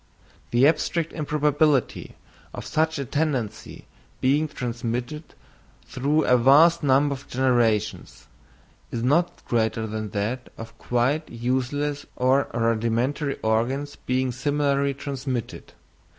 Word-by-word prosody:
The 120 +4 +4
abstract 160 +1 0
improbability 150 -3 0 0.4
of - - -7
such 160 0 0
a 140 - -3
tendency 135 -6 -3 0.3
being 145 +4 +2
transmitted 125 +3 -5 0.5
through 150 +4 0
a 125 - +5
vast 155 +7 +6
number 140 0 +3
of 135 0 -10
generations, 115 - 0 0.6
is 115 - -4
not 165 +7 +1
greater 110 -1 0
than 110 -1 -4
that 110 +6 -3
of 115 - -9
quite 130 +6 0
useless 130 +5 -2
or 130 +2 +2
rudimentary 115 +5 0
organs 125 +6 0
being 130 0 -1
similarly 140 +1 0
transmitted. 130 -4 -5
130 Hz, 105 wpm, -24 LUFS, 120-145 Hz, 0.6 s, vast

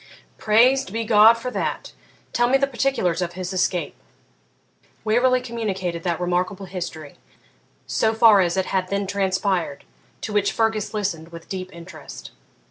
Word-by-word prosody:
'Praised 245 +4 +3
be 225 +2 -2
God 220 +1 +6
for 250 +2 -5
that! - - -3 0.4
Tell 240 0 +2
me 270 - +5
the 275 - +2
particulars 245 -10 0
of 175 -1 -3
his 185 +1 -5
escape.' 180 -1 0 1.1
Waverley 250 +3 +3
communicated 195 -8 -3
that 170 -1 -2
remarkable 180 +2 -1
history, 175 -5 -7 0.7
so 220 - +1
far 220 -3 +6
as 175 0 0
it 190 - +1
had 185 -1 -1
then 200 0 -1
transpired, 190 -5 -1 0.4
to 215 - -5
which 205 -1 +1
Fergus 220 -2 0
listened 185 -6 -2
with 170 0 -11
deep 185 -1 -5
interest. 160 - -11
195 Hz, 145 wpm, -22 LUFS, 180-225 Hz, 1.1 s, God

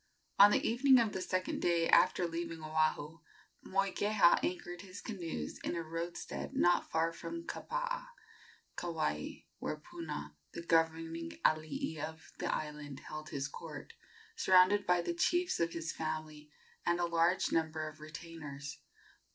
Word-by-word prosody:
On 200 +1 +11
the - - +2
evening 260 +3 +6
of 225 -3 +2
the 190 - -2
second 185 0 -1
day 170 -1 +3
after 180 -1 +5
leaving 165 -1 -4
Oahu, 155 0 0 0.4
Moikeha 195 0 +3
anchored 175 -1 -3
his 190 0 -9
canoes 170 - -5
in - - -3
a 170 - -2
roadstead 165 +2 -5
not 175 0 +3
far 165 +1 +1
from 335 - -6
Kapaa, - - -3 0.7
Kauai, 155 - -2 0.2
where 155 - -3
Puna, 150 - -7 0.2
the 170 - -6
governing 165 0 +1
alii 155 - +1
of 160 +2 -6
the - - 0
island, 150 -2 -4
held 155 0 -7
his 140 0 -2
court, - - -8 0.4
surrounded 185 +2 +5
by 180 -1 +3
the - - -1
chiefs 350 +1 +1
of 170 0 +1
his 165 -1 -3
family 155 -1 -5 0.3
and 175 0 +1
a 175 - +2
large 170 +2 +2
number 160 -1 0
of 155 0 -10
retainers. 150 -2 -8
165 Hz, 145 wpm, -34 LUFS, 155-185 Hz, 0.7 s, On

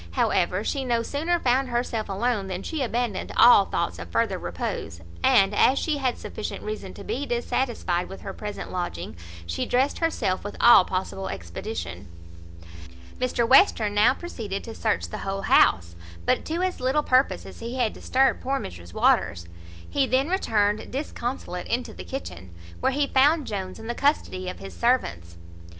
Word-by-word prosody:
However, 180 - +1
she 275 +4 -1
no 235 -2 0
sooner 320 +8 0
found 260 0 +2
herself 235 -3 -2
alone 205 0 -1
than 185 0 -4
she 315 -3 -3
abandoned 235 -5 -2
all 235 -5 +8
thoughts 85 - -2
of 85 0 -8
further - - 0
repose; 85 - -4 0.2
and, 195 +1 +5
as 260 +6 +4
she 310 -2 0
had 260 -3 -1
sufficient 215 - -6
reason 210 -3 -6
to 200 - -9
be 280 +7 -3
dissatisfied 235 -7 -1
with 195 - -9
her 195 - -6
present 210 +1 -6
lodging, 175 - -4 0.3
she 85 0 -2
dressed 260 +3 +1
herself 215 - 0
with 205 - -6
all 235 -6 +8
possible 190 +1 -3
expedition. 95 - -6 1.1
Mr 245 -2 0
Western 235 - +5
now 210 +4 +5
proceeded 220 - -5
to 225 - -7
search 220 -2 -1
the - - -6
whole 195 0 -3
house, 85 - +4 0.3
but - - +1
to 335 +3 -2
as 370 -1 -1
little 265 +4 +1
purpose 260 0 +2
as - - -11
he 235 +2 -5
had 240 -4 0
disturbed 265 +1 +1
poor 270 +1 -1
Mrs 85 -1 -9
Waters. 85 0 +2 0.4
He 275 -2 +1
then 260 +5 +1
returned 215 - +1
disconsolate 245 - -4
into 245 +2 -2
the 90 - -8
kitchen, 90 0 -7 0.2
where - - +1
he 285 +2 +1
found 290 +3 +3
Jones 190 -4 -5
in - - -10
the 240 - -2
custody 235 -10 0
of 185 - -7
his 195 - -9
servants. 85 - 0
225 Hz, 170 wpm, -25 LUFS, 185-260 Hz, 1.1 s, all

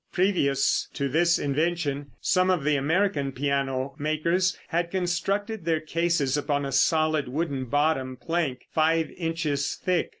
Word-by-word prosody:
Previous 145 -8 +1
to 140 - -1
this 170 +5 +3
invention 145 -1 -1
some 185 0 +2
of 180 -5 +2
the 150 0 +2
American 150 0 +1
piano 135 0 -1
makers 170 +5 +1
had 170 0 0
constructed 190 +4 -1
their 165 -1 +1
cases 155 -3 0
upon 145 -1 -1
a 135 - -4
solid 155 0 +2
wooden 140 -1 -2
bottom 135 -1 0
plank 150 -3 -2
five 160 0 +2
inches 160 -4 -2
thick. 180 -2 0
155 Hz, 135 wpm, -26 LUFS, 140-175 Hz, -, this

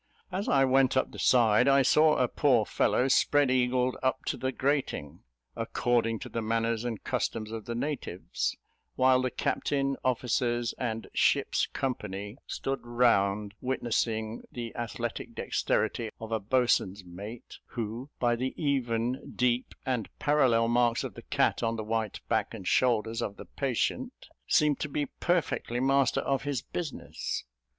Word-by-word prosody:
As 190 +3 -2
I 135 -1 +5
went 130 0 +3
up 130 - +1
the - - -9
side, 120 0 +4
I 140 0 +5
saw 155 +4 +5
a 125 - +2
poor 125 -5 +3
fellow 125 - +2
spread 140 0 +3
eagled 125 0 +2
up 130 0 0
to - - -1
the 130 0 -2
grating, 130 - -1 0.4
"according 115 -2 0
to - - -6
the 115 - -3
manners 115 +1 0
and 115 -4 -4
customs 110 -1 -2
of 115 -2 -6
the 120 - -4
natives," 125 -8 -3 0.4
while 130 0 +4
the 130 - 0
captain, 135 +2 -1
officers, 120 -1 0
and 115 -2 -2
ship's - - +2
company 105 -4 -4
stood 135 0 -2
round 105 -4 +2
witnessing 115 -3 -1
the 120 -2 -6
athletic 120 -3 -4
dexterity 110 +1 0
of 115 0 -7
a 110 - +1
boatswain's 105 -4 +1
mate, 100 +7 -9
who, 115 +3 -5
by 120 -1 +2
the 130 +2 -3
even, 125 -4 -1
deep, 125 0 +1
and 125 -5 -1
parallel 130 -6 +3
marks 120 0 +2
of - - -5
the - - -10
cat - - +1
on 115 0 0
the 110 - -4
white 110 -1 -2
back - - 0
and 90 - -8
shoulders 115 -2 +2
of 100 -3 -3
the - - -9
patient, 195 - -2 0.2
seemed 150 -2 +3
to 150 - -3
be 145 +1 -1
perfectly 170 -8 0
master 135 0 +3
of 135 -1 0
his 140 -4 -2
business. 170 -5 -4
120 Hz, 155 wpm, -29 LUFS, 115-130 Hz, 0.4 s, I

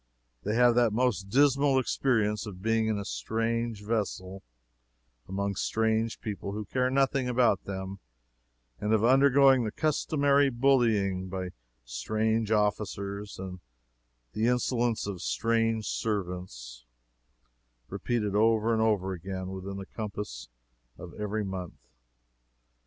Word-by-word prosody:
They 105 +2 -2
have 120 0 +5
that 120 -2 +3
most 110 -5 0
dismal 140 +2 +4
experience 110 -5 +1
of 95 -2 -9
being 115 0 +2
in 110 -1 0
a 100 - -4
strange 115 - -2
vessel, 100 -3 -3 0.9
among 100 +1 -1
strange 110 +2 0
people 100 -2 -5
who 105 0 -4
care 125 +5 0
nothing 135 -1 +1
about 120 -5 +2
them, 95 0 -5 0.8
and 105 +1 0
of 110 -1 +3
undergoing 135 +1 +5
the 110 - -2
customary 145 -1 +2
bullying 115 -8 +2
by 95 -1 -4 0.4
strange 110 - -1
officers 100 -1 -1
and 95 -1 -7 0.7
the 110 +2 +1
insolence 120 -2 +1
of 100 -4 -5
strange 115 - 0
servants, 90 - -4 1.0
repeated 110 -5 -2
over 110 +1 +3
and 110 - +1
over 100 -4 +1
again 95 +1 -5
within 95 +1 -6
the 95 - -6
compass 100 - -6 0.5
of - - -10
every 105 +1 -3
month. 95 -4 -5
110 Hz, 120 wpm, -29 LUFS, 95-120 Hz, 1.0 s, have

